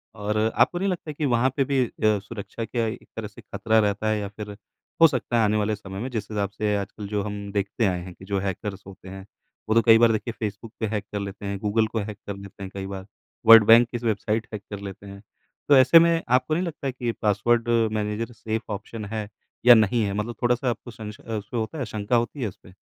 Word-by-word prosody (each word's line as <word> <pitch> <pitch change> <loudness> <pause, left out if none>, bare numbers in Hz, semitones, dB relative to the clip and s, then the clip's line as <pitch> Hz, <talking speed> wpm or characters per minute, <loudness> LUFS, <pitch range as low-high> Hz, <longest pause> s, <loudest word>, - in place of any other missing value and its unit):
और 105 0 -2 0.2
आपको 175 - +3
नहीं 195 - 0
लगता 170 -4 -4
कि 150 +1 -3
वहाँ 125 0 +3
पे 140 - +4
भी 135 -2 +2
अ, - - -8 0.3
सुरक्षा 105 +2 -7
क्या 115 +1 -1
एक 110 - -7
तरह 110 -1 -4
से 100 - -14
ख़तरा 110 0 +1
रहता 105 +1 0
है 110 0 +1
या 100 - -3
फ़िर 105 0 -8 0.5
हो 165 - +10
सकता 125 -4 -1
है 115 - +4
आने 105 +1 +2
वाले 105 0 0
समय 95 -2 -8
में 125 - -3
जिस 110 -5 -4
हिसाब 100 -2 -1
से 105 0 -1
आजकल 100 +1 -6
जो 105 0 -1
हम 100 -1 -5
देखते 100 +3 -1
आए 90 -2 0
हैं 90 0 -9
कि, 95 - -14
जो 100 0 -1
हैकर्स 95 +1 -4
होते 95 -1 -12
हैं 95 0 -9 0.4
वो 110 - +2
तो 115 - +6
कई 115 -1 +8
बार 115 0 +5
देखिए 110 +2 -2
फ़ेसबुक 110 +1 -5
पे 110 - 0
हैक 105 -1 -3
कर 105 - -2
लेते 100 0 -6
हैं 100 0 -3
गूगल 110 +2 +1
को 110 - -3
हैक 105 0 -5
कर 100 - -4
लेते 100 0 -10
हैं 95 - -6
कई 95 -1 -5
बार 95 -1 -7 0.4
वर्ल्ड 115 -1 +10
बैंक 115 +1 +8
की 120 - -3
स - - -15
वेबसाइट 110 0 -1
हैक 105 - -4
कर 100 -1 -6
लेते 100 0 -9
हैं। 100 0 -10 0.5
तो 140 - +8
ऐसे 130 +6 +8
में 170 0 +3
आपको 130 +4 +2
नहीं 170 +4 +1
लगता 145 -5 -4
कि 120 -2 -3
पासवर्ड 115 +3 +2 0.2
मैनेजर 105 +2 -2
सेफ़ 110 0 -3
ऑप्शन 105 +2 -7
है 110 -2 -3 0.4
या 125 - +11
नहीं 110 +1 +3
है 100 - -2
मतलब 105 +3 -3
थोड़ा-सा 125 +1 +2
आपको 120 +1 -5
संशय 105 -1 -9
अ, 115 - -9
उसपे 105 +4 -6
होता 115 +8 -3
है 130 - -2
शंका 110 +2 -2
होती 120 +4 -1
है 115 - 0
उसपे? 90 0 -17
110 Hz, 250 wpm, -25 LUFS, 100-120 Hz, 0.5 s, या